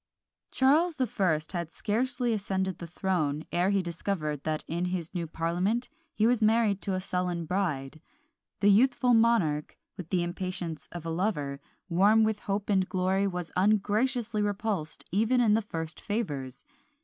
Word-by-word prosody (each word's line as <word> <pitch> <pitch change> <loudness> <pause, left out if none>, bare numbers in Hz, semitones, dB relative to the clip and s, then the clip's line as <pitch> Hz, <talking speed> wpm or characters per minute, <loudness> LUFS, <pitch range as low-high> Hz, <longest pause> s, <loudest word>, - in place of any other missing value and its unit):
Charles 310 +6 +3
the 260 - +1
First 160 -8 0
had 170 -3 -4
scarcely 245 +2 -1
ascended 190 -3 -2
the 170 - -6
throne 160 -4 -1
ere 175 +2 +2
he 200 -2 +2
discovered 170 -4 -3
that 155 -1 -1
in 170 +2 -1
his 180 -2 -3
new 170 -3 -3
parliament 180 +9 -1 0.3
he 215 - +2
was 240 0 +3
married 215 -2 +3
to 195 - -1
a - - -1
sullen 180 -2 -2
bride: 155 -5 -2 0.6
the 205 0 +6
youthful 245 +3 +4
monarch, 225 -11 +2 0.2
with 180 -4 -7
the 180 -2 +1
impatience 175 -3 -4
of 175 -2 -7
a 165 - -2
lover, 155 -6 -1 0.3
warm 200 +5 +4
with 220 -1 +1
hope 200 -1 -2
and 190 -2 +2
glory, 190 +2 +1
was 180 -3 -4
ungraciously 215 +3 +1
repulsed 205 -6 -2
even 225 +7 +2
in 225 -4 +4
the 220 - +3
first 165 -5 -6
favours! 145 - -4
190 Hz, 160 wpm, -29 LUFS, 170-215 Hz, 0.6 s, the